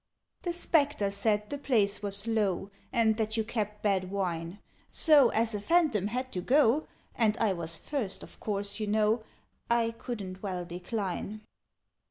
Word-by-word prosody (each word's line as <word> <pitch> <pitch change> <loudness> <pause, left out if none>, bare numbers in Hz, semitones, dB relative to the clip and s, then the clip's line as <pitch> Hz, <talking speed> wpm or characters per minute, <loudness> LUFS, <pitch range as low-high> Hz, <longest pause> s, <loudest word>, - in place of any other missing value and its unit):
"The 350 - -2
Spectres 290 - +1
said 210 +1 0
the 285 - -3
place 215 -8 +1
was 200 0 -3
low, 205 -4 0 0.2
And 225 -3 +3
that 220 0 -1
you 220 - +2
kept 210 -2 -4
bad 190 -3 +1
wine: 180 -2 -3 0.3
So, 295 -6 +7
as 225 0 +1
a 205 - -3
Phantom 290 - +2
had 255 +4 -3
to 180 - -3
go, 275 - +3 0.3
And 220 -2 +2
I 220 -4 +2
was 165 -2 -3
first, 245 -10 -4
of - - -13
course, 200 0 -3
you 215 - -2
know, 215 +2 +2 0.5
I 235 -1 +2
couldn't 195 -6 -6
well 185 -3 -3
decline." 190 +3 -4
215 Hz, 160 wpm, -30 LUFS, 195-235 Hz, 0.5 s, So